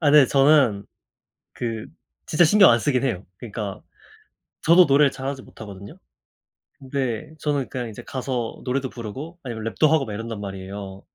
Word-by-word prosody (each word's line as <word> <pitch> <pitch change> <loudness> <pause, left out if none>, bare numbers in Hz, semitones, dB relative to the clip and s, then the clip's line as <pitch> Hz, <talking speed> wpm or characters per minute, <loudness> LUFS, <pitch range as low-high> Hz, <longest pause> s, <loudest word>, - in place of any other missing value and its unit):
아 150 -4 +3
근데 150 -3 +8
저는 135 -8 +4 0.7
그 115 -3 -4 0.4
진짜 160 +3 +4
신경 200 +4 +7
안 115 - +5
쓰긴 130 +1 0
해요. 110 -8 -2
그니까 105 -4 -6 0.8
저도 170 +3 +6
노래를 140 -1 +4
잘하지 135 0 -5
못하거든요. 100 -4 -11 0.8
근데 130 -1 -3
저는 145 -3 -1
그니까 125 -2 -4
이제 105 - -10
가서 125 -3 -4
노래도 130 +1 -1
부르고 135 - -8
아니면 115 -6 -6
랩도 155 - +3
하고 155 -3 +3
막 110 - -6
이런단 115 0 -5
말이에요, 95 0 -7
130 Hz, 340 characters per minute, -23 LUFS, 110-145 Hz, 0.8 s, 근데